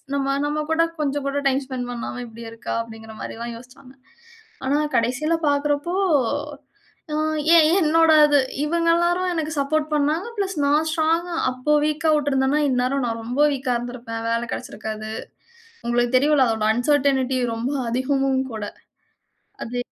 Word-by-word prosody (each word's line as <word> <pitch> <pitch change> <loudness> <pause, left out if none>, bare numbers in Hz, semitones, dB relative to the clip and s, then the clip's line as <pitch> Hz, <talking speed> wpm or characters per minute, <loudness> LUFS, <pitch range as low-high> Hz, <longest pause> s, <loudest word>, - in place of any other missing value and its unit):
நம்ம, 275 0 0
நம்ம 300 +1 -1
கூட 320 +1 +3 0.2
கொஞ்சம் 285 -1 -1
கூட 280 +1 -1
டைம் 270 +1 0
ஸ்பெண்ட் 255 -2 -4
பண்ணாம, 245 +1 -5
இப்பிடி 230 0 -11
இருக்கா. 230 0 -6
அப்பிடிங்கிற 220 -1 -11
மாரில்லாம் 235 +1 -6
யோசிச்சாங்க. 250 +2 -15 0.7
ஆனா 275 +2 +2 0.2
கடைசியில 250 +8 +1
பார்க்கிறப்போ, 290 +3 0 1.2
அ, - - 0 0.4
ஏன் 320 -2 +7
என்னோட 325 0 +4 0.2
இது, 290 -1 +4 0.3
இவுங்க 335 +2 +1
எல்லாரும், 350 +2 +1
எனக்கு 315 -2 -2
சப்போர்ட் 305 +2 0
பண்ணாங்க. 300 +7 0
பிளஸ் 390 -3 -2
நான் 300 +3 +2
ஸ்ட்ராங்கா 330 +2 0 0.2
அப்போ 255 +4 0
வீக்கா 305 +1 +1
விட்டிருந்தன்னா 280 -1 +1
இந்நேரம் 255 +1 0
நான் 230 -1 -3
ரொம்ப 245 +5 -1
வீக்கா 260 -2 -1
இருந்திருப்பேன். 235 -1 -6
வேல 230 +1 0
கெடைச்சிருக்காது. 215 0 -6 0.8
உங்களுக்கு 240 +1 +1
தெரியும்ல 285 0 +4
அதோட 220 -1 0
அன்சர்டனிட்டி 265 0 +1 0.2
ரொம்ப 240 +5 -2 0.2
அதிகமும் 265 +2 +1
கூட. 215 -1 -5 1.0
அது 245 +2 -5
275 Hz, 140 wpm, -22 LUFS, 245-300 Hz, 1.2 s, ஏன்